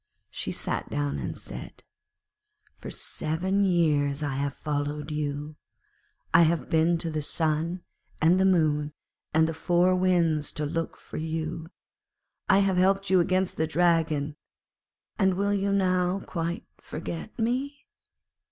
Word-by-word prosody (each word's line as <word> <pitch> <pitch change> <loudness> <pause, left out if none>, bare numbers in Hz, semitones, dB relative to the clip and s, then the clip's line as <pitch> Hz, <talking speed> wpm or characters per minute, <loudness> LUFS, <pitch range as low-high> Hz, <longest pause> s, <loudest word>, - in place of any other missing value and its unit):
She - - -4
sat - - -3
down 145 -1 -1
and - - -4
said: - - -9 1.0
'For - - -7
seven 185 +6 -1
years 150 -6 +2
I 145 -2 -1
have 140 +1 -2
followed 150 0 -3
you. 150 0 -3 0.8
I 165 - +8
have 165 -5 +2
been 165 +1 +3
to 165 0 -3
the 155 -1 -2
Sun, 160 +3 -1 0.4
and 170 +4 +4
the 190 - +4
Moon, 150 -5 +2 0.4
and 160 +1 +4
the 165 - -2
Four 175 +3 +3
Winds 170 -5 +2
to 150 -2 -2
look 165 +2 -3
for - - -9
you. 160 0 -3 0.8
I 195 0 +6
have 190 -2 +1
helped 195 +1 +2
you 185 - +6
against 185 +2 +1
the 160 - +1
Dragon, 160 -3 +1 0.8
and 190 -2 +3
will 200 +2 +1
you 200 0 0
now 185 -1 +2
quite 170 0 -3
forget 165 +6 -6
me?' 260 +5 -2
165 Hz, 140 wpm, -27 LUFS, 150-185 Hz, 1.0 s, I